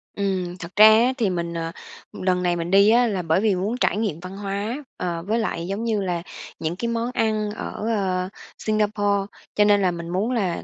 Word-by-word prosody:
Ừm, 185 -3 -2
thật 175 0 -9
ra 210 +2 +9
á 230 +4 +5
thì 220 -5 +1
mình, 170 -2 -2
ờ, 165 0 -3 0.4
lần 180 -1 0
này 175 -1 +2
mình 170 +1 -3
đi 200 +2 +6
á, 240 +2 +5
là 195 -5 -1
bởi 165 +2 +1
vì 210 -3 +2
muốn 205 +7 -2
trải 230 - +1
nghiệm 210 -8 -1
văn 185 +2 -8
hóa, 205 +7 -3
ờ, 170 -2 -3
với 225 +2 +1
lại, 170 -6 -2
giống 200 +4 -3
như 220 -3 0
là, 175 -3 -2 0.4
những 160 +2 -2
cái 235 +6 -3
món 235 +1 -1
ăn 215 -2 0
ở, 210 - -5 0.2
ờ, 185 -4 0 0.3
Singapore. 205 -2 0 0.3
Cho 210 - +5
nên 205 -1 +4
là 185 - +2
mình 170 -1 -6
muốn 200 +7 0
là, 195 -8 -1
195 Hz, 220 wpm, -23 LUFS, 180-215 Hz, 0.4 s, ra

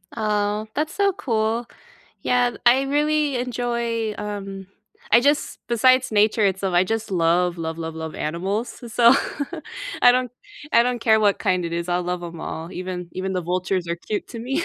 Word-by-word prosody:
Oh, 210 -1 0
that's 310 +1 -1
so 400 -1 +2
cool. 225 -2 -1 0.6
Yeah. 245 -1 +2
I 255 +3 +6
really 295 0 +1
enjoy, 235 -3 -2
um 195 -2 -6 0.5
I 230 - +8
just 285 +3 +1
besides 255 +2 +4
nature 215 0 +3
itself, 190 -1 0
I 175 - +5
just 225 +2 -3
love, 175 0 +2
love, 160 0 -4
love, 160 -1 -5
love 160 -1 -6
animals, 195 - -3
so, 240 +2 +6 0.9
I 245 - +9
don't 250 -1 +1 0.4
I 235 - +6
don't 245 -1 -1
care 220 -2 +4
what 205 -2 +3
kind 185 -1 0
it 170 - -4
is, 170 +1 -3
I'll 175 0 +1
love 180 0 -3
'em 170 -1 -8
all, 165 +2 -6
even 180 -1 -5
even 190 +1 -3
the 185 - -1
vultures 180 +1 -1
are 170 - 0
cute 205 +4 -4
to 235 - -8
me. 270 +8 -1
210 Hz, 175 wpm, -23 LUFS, 180-245 Hz, 0.9 s, I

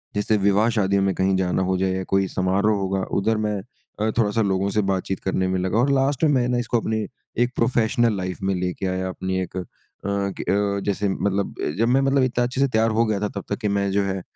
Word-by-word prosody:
जैसे 105 +1 +1
विवाह 100 +3 +3
शादियों 100 0 +2
में 95 -1 +1
कहीं 95 0 +2
जाना 95 0 0
हो 95 0 0
जाए 95 0 +1
या 95 0 -2
कोई 95 -1 +2
समारोह 95 +4 +1
होगा 95 0 -1 0.2
उधर 110 +3 +1
मैं 105 -1 -1 0.4
अ, 110 +1 +1
थोड़ा-सा 110 0 +2
लोगों 95 -1 +1
से 105 +1 +1
बातचीत 95 0 -2
करने 95 -1 0
में 95 0 0
लगा 95 +4 0
और 140 +3 +3
लास्ट 135 +2 +1
में 150 - +5
मैं 125 -3 +2
ना 125 - +1
इसको 120 0 0
अपनी 110 -1 -1 0.4
एक 120 - -1
प्रोफेशनल 115 -2 +2
लाइफ़ 90 -1 -4
में 95 - +1
लेके 90 +1 -3
आया 95 0 -2
अपनी 95 0 -3
एक 90 0 -6
अ, 90 - -2 0.4
क 100 0 -1
जैसे 100 0 0
मतलब 100 0 -1 0.2
जब 115 - +2
मैं 130 +3 +3
मतलब 135 -1 +3
इतना 125 -1 +1
अच्छे 125 +2 -1
से 140 - +4
तैयार 110 -2 +2
हो 115 - +4
गया 105 -2 0
था 105 - 0
तब - - -9
तक 100 - -1
कि 105 - 0
मैं 100 0 0
जो 100 +1 +2
है 95 -1 -2
100 Hz, 240 wpm, -23 LUFS, 95-115 Hz, 0.4 s, में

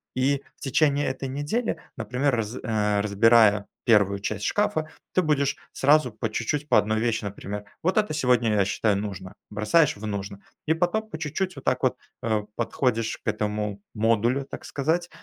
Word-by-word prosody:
И 135 +2 +1
в - - -35
течение 145 +1 +2
этой 130 +1 -3
недели, 145 - -2 0.2
например 125 +4 0
раз 115 0 -3
э, 105 -3 +1
разбирая 105 0 +5 0.2
1 100 -4 +4
часть 105 +1 -3
шкафа, 160 -7 0 0.2
ты 185 - +4
будешь, 140 -3 +1 0.2
сразу, 145 -1 +4
по 110 - -3
чуть-чуть, 145 +6 -2
по - - +6
1 110 +1 +2
вещи, 115 -1 0
например: 100 +1 -6 0.2
"Вот 185 +4 +1
это 210 -6 +2
сегодня 125 -6 +2
я 100 -2 +3
считаю 105 +1 +1
нужно"- 100 -2 -5 0.2
бросаешь 110 +8 +2
в 105 - -7
"нужно". 100 -1 -5 0.3
И 160 - +4
потом 215 +6 0
по 160 - -6
чуть-чуть, 165 +4 -2
вот 135 - -11
так - - +1
вот, - - +1 0.2
э, 110 -2 0
подходишь 115 -1 0
к - - -13
этому 105 -1 -2
модулю, 115 +5 +2
так - - -9
сказать, 165 +5 -1
120 Hz, 175 wpm, -25 LUFS, 105-145 Hz, 0.3 s, по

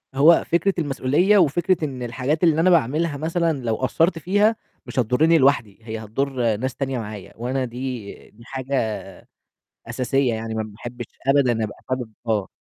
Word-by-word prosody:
هو 155 +5 +6
فكرة 175 +4 +2
المسؤولية 150 +7 +2
وفكرة 175 0 +2
إن 130 -4 -5
الحاجات 130 +7 -2
اللي 160 -2 +4
أنا 185 - +4
باعملها 155 -1 +2
مثلًا 165 +2 0
لو 115 -2 0
قصّرت 165 +7 +1
فيها 205 +6 +2 0.3
مش - - -3
هتضرني 140 +8 +4
لوحدي، 130 -8 +2
هي 110 0 -6
هتضر 120 0 -1
ناس 130 +2 -3
تانية 135 -2 -2
معايا 105 -3 -8
وأنا 130 +3 -1
دي 125 -2 -5 0.2
دي 115 +2 -18
حاجة 130 -4 -2 0.9
أساسية 130 0 0
يعني، 110 0 -4
ما 110 - -1
باحبش 120 +3 -8 0.2
أبدا 130 -5 +3
أبقى 105 - -6
حابب 125 -3 -3 0.2
آه. 105 -4 0
130 Hz, 155 wpm, -22 LUFS, 115-160 Hz, 0.9 s, هو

